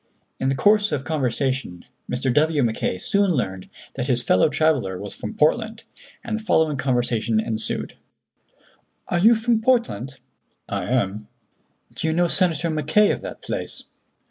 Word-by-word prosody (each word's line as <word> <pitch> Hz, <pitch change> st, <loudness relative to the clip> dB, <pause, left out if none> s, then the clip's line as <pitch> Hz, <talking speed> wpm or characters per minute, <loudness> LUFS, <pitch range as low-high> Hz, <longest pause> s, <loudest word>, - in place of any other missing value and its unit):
In 130 Hz, -, 0 dB
the 135 Hz, -, +1 dB
course 210 Hz, +5 st, +3 dB
of 140 Hz, -3 st, -2 dB
conversation 130 Hz, -, -2 dB, 0.3 s
Mr. 125 Hz, 0 st, 0 dB
W. 150 Hz, 0 st, +2 dB
Mackay 110 Hz, -5 st, -1 dB
soon 200 Hz, -, +1 dB
learned 95 Hz, -, -3 dB, 0.2 s
that 125 Hz, -1 st, -3 dB
his 125 Hz, -2 st, +1 dB
fellow 95 Hz, +3 st, +3 dB
traveller 140 Hz, -13 st, +1 dB
was 100 Hz, -1 st, -7 dB
from 105 Hz, -, -7 dB
Portland, 220 Hz, +8 st, +1 dB, 0.4 s
and 230 Hz, -3 st, -3 dB
the 220 Hz, -, -4 dB
following 160 Hz, -8 st, +2 dB
conversation 120 Hz, -4 st, 0 dB
ensued: 110 Hz, 0 st, -2 dB, 1.2 s
"Are 175 Hz, -, +1 dB
you 225 Hz, +6 st, +6 dB
from 225 Hz, 0 st, +1 dB
Portland?" 230 Hz, -, 0 dB, 0.5 s
"I -, -, -3 dB
am." 105 Hz, -4 st, -1 dB, 0.7 s
"Do -, -, -3 dB
you 160 Hz, -, +1 dB
know 175 Hz, +1 st, +2 dB
Senator 170 Hz, -2 st, +1 dB
Mackay, 155 Hz, +7 st, +3 dB
of -, -, -3 dB
that -, -, -8 dB
place?" -, -, -5 dB
145 Hz, 150 wpm, -23 LUFS, 120-180 Hz, 1.2 s, you